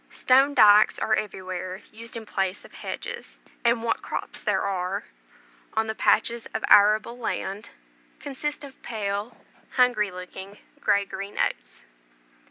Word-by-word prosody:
Stone 270 +3 +3
dykes 210 -3 +7
are 220 - 0
everywhere 185 -2 -3
used 230 +2 -7
in 225 - -8
place 190 -1 -2
of - - -16
hedges; 475 -1 -7 0.3
and 235 -1 +2
what 230 - 0
crops - - -5
there - - +1
are, 190 +1 -2 0.7
on 220 0 +2
the 220 - -2
patches 235 +1 +1
of - - -2
arable 215 +4 +5
land, 210 -2 -4 0.5
consist 290 +1 -4
of 275 -2 -12
pale, 205 0 -4 0.3
hungry 245 -5 +3
looking, 190 +2 -9 0.2
grey 200 -1 +2
green 200 +1 -7
oats. - - -2
215 Hz, 135 wpm, -25 LUFS, 195-235 Hz, 0.7 s, dykes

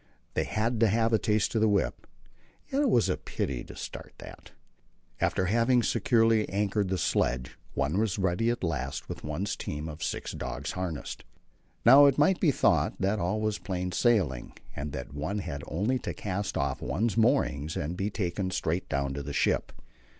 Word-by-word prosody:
They - - 0
had 115 +2 -1
to 115 - +5
have 115 +2 +2
a 110 - +4
taste 105 -1 +1
of 110 - +1
the 110 - +4
whip, 100 -3 0 0.6
and 275 - +1
yet - - +4
it 285 - +3
was 120 - +4
a - - 0
pity 65 -3 -3
to - - -11
start - - -8
that. - - -11 0.7
After 95 - +1
having 115 +5 +3
securely 115 -3 +3
anchored 100 0 0
the 95 0 -1
sledge, 60 -6 0 0.2
one 70 +7 0
was 110 -3 0
ready 95 +4 +1
at 120 -3 -2
last 75 -4 -2
with - - -7
one's 80 +7 -2
team 75 +2 -5
of 75 -1 -8
six - - -3
dogs 70 +2 -4
harnessed. 90 -5 -5 0.6
Now 140 +1 +9
it 140 - +3
might 160 +5 +4
be 170 - +4
thought 135 - +2
that 100 +3 +1
all 100 +5 0
was 110 -1 -1
plain 90 -1 -3
sailing 90 - +1 0.2
and 75 +1 -4
that 65 -3 -6
one 80 +8 -3
had 80 -7 -4
only 105 - 0
to - - -5
cast 100 0 -3
off 70 -1 -1
one's 95 - 0
moorings 110 - +2
and 75 +5 -2
be 95 +3 -1
taken 95 -2 -2
straight 90 0 -2
down 70 0 -1
to 70 - -4
the 70 +1 -6
ship. - - +1
95 Hz, 190 wpm, -29 LUFS, 75-110 Hz, 0.7 s, Now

